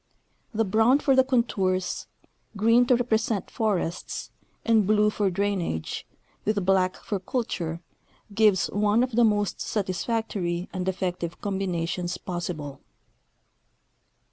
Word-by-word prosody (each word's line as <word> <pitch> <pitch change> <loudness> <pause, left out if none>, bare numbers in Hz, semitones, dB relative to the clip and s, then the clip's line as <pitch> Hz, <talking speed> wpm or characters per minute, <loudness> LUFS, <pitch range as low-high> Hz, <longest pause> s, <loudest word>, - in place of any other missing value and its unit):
The 225 -1 +1
brown 220 +7 +4
for 275 -2 +2
the 260 - +6
contours, 200 -8 0 0.5
green 230 +4 +4
to 250 - +5
represent 220 -4 0
forests, 195 -7 -2 0.3
and 220 -4 +4
blue 210 0 +4
for 205 -2 +1
drainage, 185 - -2 0.4
with 205 -3 0
black 185 -1 +3
for 200 - -4
culture, 180 -6 -3 0.5
gives 205 -3 +4
one 210 +3 +3
of 255 - -2
the 240 +1 +3
most 205 -3 +1
satisfactory 190 -3 -2
and 185 -1 -1
effective 180 -2 -3
combinations 180 -3 -2
possible. 170 -6 -5
200 Hz, 115 wpm, -26 LUFS, 180-225 Hz, 0.5 s, the